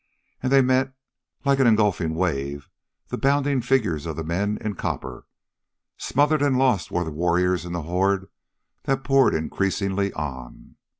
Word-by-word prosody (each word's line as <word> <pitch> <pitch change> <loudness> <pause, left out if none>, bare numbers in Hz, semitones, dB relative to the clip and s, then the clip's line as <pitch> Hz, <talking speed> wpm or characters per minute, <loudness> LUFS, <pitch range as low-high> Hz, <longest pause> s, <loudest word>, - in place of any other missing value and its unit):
And 130 - -1
they 135 -1 +6
met, 130 +1 +1 0.5
like 140 0 +3
an 135 - +5
engulfing 105 -7 +2
wave, 70 -5 -2 0.4
the - - -4
bounding 140 -1 +2
figures 110 - 0
of 80 - -4
the 80 - -4
men 100 +6 -1
in 105 -1 -3
copper. - - -5 0.7
Smothered 145 +2 +1
and 140 -3 +2
lost 125 -7 +2
were 90 - -1
the 80 - -5
warriors 90 +3 +1
in 85 - -6
the 85 -2 -3
horde 95 +3 0 0.6
that 135 0 0
poured 135 -1 +4
increasingly 95 +4 -1
on. 65 -5 -7
100 Hz, 155 wpm, -24 LUFS, 85-130 Hz, 0.7 s, they